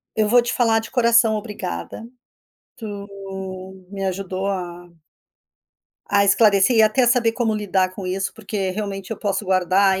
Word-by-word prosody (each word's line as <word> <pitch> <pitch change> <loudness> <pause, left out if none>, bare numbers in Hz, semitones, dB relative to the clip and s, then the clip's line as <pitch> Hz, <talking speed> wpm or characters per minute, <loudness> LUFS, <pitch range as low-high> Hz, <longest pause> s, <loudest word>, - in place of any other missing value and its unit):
eu 215 -1 +2
vou 245 +2 +5
te 235 - -3
falar 225 -2 +2
de 225 - -8
coração, 235 -2 +3
obrigada, 210 - -6 0.7
tu 205 -3 -7 0.8
me 195 -1 -5
ajudou 190 0 -3
a 175 -2 -5 1.2
a 200 0 +3
esclarecer 200 +2 +4
e 220 - +6
até 220 +4 +3
saber 235 -1 +3
como 230 -2 -1
lidar 190 -3 0
com 190 -1 -7
isso, 190 +1 -2
porque 200 -3 -4
realmente 195 0 -5
eu 225 - -3
posso 205 0 -2
guardar, 190 +1 +2
200 Hz, 150 wpm, -21 LUFS, 190-225 Hz, 1.2 s, e